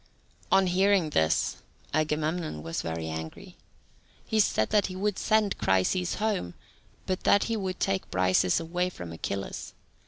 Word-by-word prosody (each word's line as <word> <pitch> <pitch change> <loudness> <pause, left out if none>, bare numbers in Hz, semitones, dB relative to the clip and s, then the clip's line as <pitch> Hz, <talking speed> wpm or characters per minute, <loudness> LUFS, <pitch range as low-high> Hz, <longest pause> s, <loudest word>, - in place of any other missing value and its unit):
On 195 - +5
hearing 185 -2 +3
this, 80 - +1 0.4
Agamemnon 155 - -1
was 80 0 -3
very 80 0 -4
angry. 80 0 -7 0.7
He 220 - 0
said 110 - +2
that 210 -2 +3
he 185 - -7
would 205 +1 -1
send 215 -3 +2
Chryseis 95 - +1
home, 205 - -1 0.5
but 185 -1 -1
that 200 - +4
he 230 - -1
would 190 -3 -3
take 195 -1 -1
Briseis 95 -1 +2
away 175 +2 -1
from 90 - -8
Achilles. 95 +4 -5
175 Hz, 145 wpm, -28 LUFS, -, 0.7 s, On